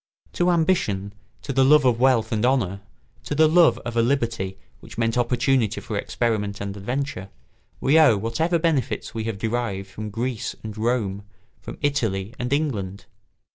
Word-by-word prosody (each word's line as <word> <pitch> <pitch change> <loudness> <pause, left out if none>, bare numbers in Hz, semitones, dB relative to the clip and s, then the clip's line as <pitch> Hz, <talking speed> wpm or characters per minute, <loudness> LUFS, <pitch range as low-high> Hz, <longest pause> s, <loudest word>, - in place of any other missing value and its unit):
To 175 0 +1
ambition, 160 - +1 0.3
to 135 - -4
the 135 +1 +4
love 145 +1 +5
of 120 -2 +3
wealth 130 -2 +3
and 110 -2 0
honour, 115 -7 +1 0.4
to 155 +2 +3
love 170 +1 +5
of 120 -1 -4
a 115 - +4
liberty 115 -7 -1 0.2
which - - -13
meant 115 -1 0
opportunity 120 -2 +1
for 105 +1 -6
experiment 105 -1 -1
and 100 0 -5
adventure, 120 -1 -4 0.5
we 150 +4 +4
owe 145 -9 +6
whatever 115 - 0
benefits 140 -9 -1
we 110 -1 -4
have 110 -3 -3
derived 110 -3 -2
from 105 +2 -6
Greece 120 +3 -3
and 110 -1 -6
Rome, 110 -3 -1 0.4
from - - -9
Italy 115 -8 -1
and 125 +1 -3
England. 110 -11 -2
115 Hz, 160 wpm, -23 LUFS, 105-135 Hz, 0.5 s, owe